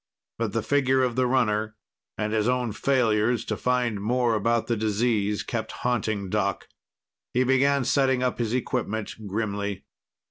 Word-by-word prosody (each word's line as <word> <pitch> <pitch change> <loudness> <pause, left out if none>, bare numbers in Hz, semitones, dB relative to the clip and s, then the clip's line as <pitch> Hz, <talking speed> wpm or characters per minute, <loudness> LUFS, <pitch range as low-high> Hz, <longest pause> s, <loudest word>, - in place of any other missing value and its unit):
But 115 -3 -1
the 115 - -1
figure 130 0 +2
of 125 -2 0
the 130 0 +2
runner 110 -4 +1 0.4
and 105 0 -2
his 110 0 +1
own 125 -2 0
failures 115 -1 +1
to - - -2
find 125 -5 0
more 120 +2 +1
about 115 +2 +1
the 120 - 0
disease 105 -1 0
kept 110 0 -4
haunting 110 -5 0
Doc. - - -1 0.7
He 125 - +4
began 135 +1 +3
setting 130 -2 +2
up 125 -1 -1
his 115 -2 -1
equipment 115 -3 -2
grimly. 100 -1 -3
115 Hz, 150 wpm, -26 LUFS, 105-125 Hz, 0.7 s, He